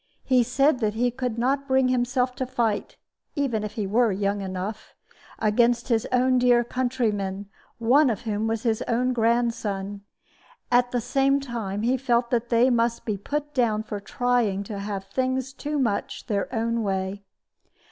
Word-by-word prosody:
He 255 -2 +4
said 260 +3 +2
that 215 -2 0
he 245 +2 +1
could 250 -2 -3
not 275 +4 0
bring 265 -1 +3
himself 250 0 +1
to 260 - -2
fight 235 -5 -1 0.4
(even 255 -8 0
if 210 - -5
he 215 - -2
were 225 +3 +2
young 200 +1 -1
enough) 190 +3 -5 0.4
against 235 +3 +2
his 225 -2 +1
own 255 0 +3
dear 245 -1 +4
countrymen, 220 -6 -2 0.3
one 260 +5 +4
of 220 - -2
whom 215 -1 -2
was 225 0 -2
his 225 -3 0
own 250 +2 +1
grandson; 225 -4 0 0.7
at 245 0 +4
the 245 -1 -1
same 270 +3 +2
time 220 -6 -4
he 250 +3 +2
felt 240 -2 +1
that 240 -1 0
they 240 +2 +4
must 235 0 +1
be 215 - -1
put 295 +8 -4
down 225 -4 +1
for 210 -1 -5
trying 230 -3 0
to 200 0 -6
have 200 -1 -4
things 260 +5 -2
too 295 +3 -3
much 235 -7 -1
their 205 -2 -2
own 230 -1 -1
way. 195 -1 -2
235 Hz, 165 wpm, -25 LUFS, 210-255 Hz, 0.7 s, He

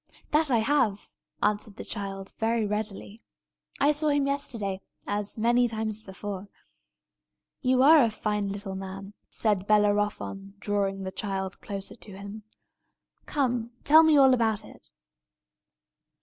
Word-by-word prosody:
"That 305 0 +3
I 245 - +4
have," 225 -4 +1 0.3
answered 210 0 0
the - - -8
child, 195 -2 -6
very 225 0 +1
readily. 210 +1 -4 0.6
"I 285 - +5
saw 300 +1 +1
him 285 -1 +2
yesterday, 230 -9 -1 0.2
and 205 0 -1
many 240 +2 +3
times 220 -1 -3
before." 195 0 -7 1.1
"You 255 -1 +3
are 305 0 +8
a - - +1
fine 210 -2 -2
little 200 -1 -5
man!" 195 +1 -7 0.2
said 205 -3 0
Bellerophon, 205 -1 +1
drawing 200 -1 -1
the 190 - -4
child 190 -1 -4
closer 195 -2 -4
to 205 -4 -11
him. 200 +2 -8 0.9
"Come, 245 -5 -1
tell 315 +2 +8
me 315 -2 +5
all 265 -2 +7
about 225 -4 +1
it." - - -16
210 Hz, 135 wpm, -27 LUFS, 200-245 Hz, 1.1 s, are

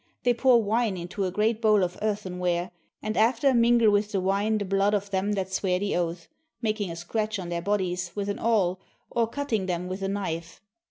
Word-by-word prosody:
They 245 - +4
pour 240 -1 +4
wine 215 -1 +1
into 180 +3 -3
a 185 - -2
great 215 +3 +1
bowl 215 -3 +4
of 180 0 -2
earthenware, 180 -4 -1 0.3
and 215 0 -2
after 240 +5 +3
mingle 235 -2 +5
with 205 +1 +1
the 195 - +2
wine 200 +3 +1
the 205 - -2
blood 195 +2 +2
of 200 0 -3
them 195 +2 0
that 190 -1 -3
swear 185 -1 +1
the 200 +2 -1
oath, 170 -1 -2 0.3
making 215 -4 -1
a 165 - -5
scratch 215 +6 -2
on 180 -3 -6
their 170 0 -2
bodies 180 -2 -1
with 200 -1 -2
an 205 - -3
awl 195 -6 +1 0.3
or 230 -1 +1
cutting 230 -6 -2
them 180 0 -2
with 185 +2 -5
a 195 - -1
knife. 175 -4 -4
200 Hz, 210 wpm, -26 LUFS, 180-220 Hz, 0.3 s, mingle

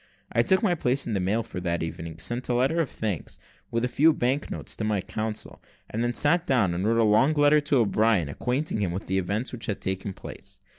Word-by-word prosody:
I 115 - +3
took 190 - +2
my 190 -5 +3
place 135 -4 0
in 115 - -3
the 100 - 0
mail 100 +5 0
for 90 - -7
that 85 -2 -1
evening, 80 0 -6
sent 120 +11 -2
a 120 - +2
letter 135 +7 +2
of 150 - -2
thanks, 105 -7 -4 0.3
with 115 +1 0
a - - +1
few 155 +5 +4
bank 135 +1 0
notes, - - -4
to - - -3
my 105 -2 +1
counsel, 110 +3 -4 0.3
and 115 +2 -1
then 120 0 -1
sat 170 +4 +3
down 110 -10 +2
and 90 +4 -1
wrote 115 +1 +2
a 115 - +4
long 130 +9 +4
letter 145 +1 +5
to 145 -1 +1
O'Brien, 110 - +2
acquainting 125 - -2
him 90 -4 -1
with 95 +4 -5
the 95 +1 0
events 100 +7 -2
which 120 -2 -6
had 100 - -2
taken 95 +1 -3
place. 95 - -9
115 Hz, 240 wpm, -26 LUFS, 95-135 Hz, 0.3 s, letter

